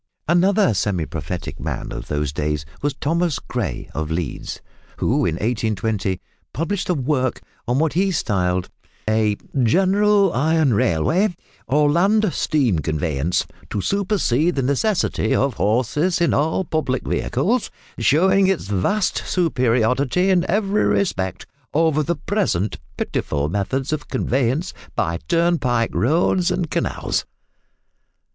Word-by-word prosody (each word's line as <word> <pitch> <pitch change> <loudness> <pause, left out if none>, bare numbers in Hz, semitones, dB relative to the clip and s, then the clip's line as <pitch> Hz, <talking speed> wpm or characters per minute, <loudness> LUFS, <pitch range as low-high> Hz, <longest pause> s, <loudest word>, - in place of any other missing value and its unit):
Another 180 - +3
semi 95 -4 0
prophetic 80 +4 -5
man - - -4
of - - -6
these 75 -1 -2
days 75 0 -2 0.2
was 145 0 -1
Thomas 165 0 0
Gray, 120 -5 -4
of 80 0 -3
Leeds, 80 -1 -4 0.4
who - - +1
in 80 - -1
1820 105 -3 -1 0.3
published 180 +6 -2
a 180 - +2
work 130 -2 0 0.3
on 120 +2 +1
what 155 +1 +1
he 195 +3 +2
styled 90 - 0 0.4
a 110 -1 +2 0.2
"General 195 - +3
Iron 155 0 +2
Railway, 160 - +2 0.3
or 145 +2 +3
Land 200 +4 +3
Steam 130 - +1
Conveyance, 80 +1 -1 0.2
to - - -2
supersede 180 - +1
the 135 - 0
necessity 140 - +1
of 135 -1 +1
Horses 130 - +1
in 170 - +2
all 160 +6 +1
public 150 -5 -1
vehicles, 210 - 0 0.3
showing 190 +6 +4
its 190 - -1
vast 145 - +1
superiority 130 - +2
in 180 -1 +2
every 210 0 +1
respect 95 - 0 0.3
over 160 -1 +3
the 170 +3 -1
present 150 - -1 0.2
pitiful 75 0 -1
Methods 130 - -1
of 155 - -4
Conveyance 130 +5 0 0.2
by 85 +1 -1
Turnpike 165 -9 +1
Roads 175 +7 +2
and 175 -4 -2
Canals." - - -1
140 Hz, 125 wpm, -21 LUFS, -, 0.4 s, showing